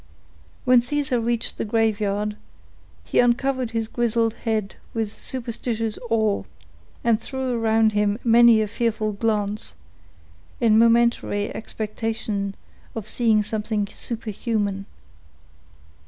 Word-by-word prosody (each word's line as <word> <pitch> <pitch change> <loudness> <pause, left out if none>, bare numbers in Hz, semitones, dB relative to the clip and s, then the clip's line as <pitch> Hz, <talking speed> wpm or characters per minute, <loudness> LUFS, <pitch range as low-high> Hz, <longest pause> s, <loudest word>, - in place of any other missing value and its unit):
When 250 -1 +6
Caesar 265 0 0
reached 230 0 -2
the - - 0
graveyard, 210 -2 0 0.7
he - - 0
uncovered 250 +1 +2
his 225 -1 -2
grizzled 230 -1 +1
head 220 -4 -2 0.2
with 220 -2 -2
superstitious 230 -3 -4
awe, 220 -3 +1 0.6
and 230 -2 +2
threw 265 -1 -3
around 225 -1 +3
him 205 0 +1
many 235 -1 +6
a - - -2
fearful 220 0 -1
glance, 210 - -1 0.8
in 220 -2 +5
momentary 230 -3 +3
expectation 215 -2 -3 0.4
of 225 -3 -5
seeing 220 -3 +3
something 210 0 -1
superhuman. 210 -2 -3
225 Hz, 105 wpm, -23 LUFS, 210-235 Hz, 0.8 s, When